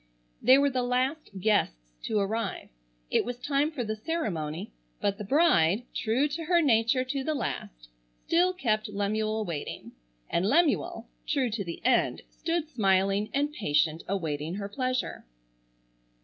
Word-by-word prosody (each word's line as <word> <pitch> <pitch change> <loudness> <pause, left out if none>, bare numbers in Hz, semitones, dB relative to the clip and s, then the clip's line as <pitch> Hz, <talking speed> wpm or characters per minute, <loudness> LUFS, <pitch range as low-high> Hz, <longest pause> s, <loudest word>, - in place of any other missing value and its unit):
They 255 +3 +7
were 280 0 +3
the 255 -1 0
last 255 +5 0
guests - - 0
to 215 - 0
arrive. 210 0 -2 0.4
It - - +3
was 245 0 -5
time 280 +3 +1
for 295 -6 -4
the 215 -1 -3
ceremony, 185 - -3 0.3
but 200 +1 -1
the - - -4
bride, 215 - +3
true 245 +6 +1
to 320 +3 -4
her 345 +1 +4
nature 245 -3 +3
to 265 +1 -3
the 310 +2 -1
last, - - -5 0.4
still 355 +2 +3
kept 215 -12 -1
Lemuel 215 +2 -1
waiting; 160 -5 -5 0.4
and 185 +4 0
Lemuel, 325 +3 +2 0.2
true 265 -5 +1
to 210 -1 -2
the 170 +4 -8
end, 245 -2 +2
stood 335 -1 -2
smiling 195 -4 +2
and 290 +2 0
patient 160 - +1
awaiting 160 -4 -2
her 200 0 -4
pleasure. 255 +3 -2
225 Hz, 150 wpm, -28 LUFS, 195-280 Hz, 0.4 s, They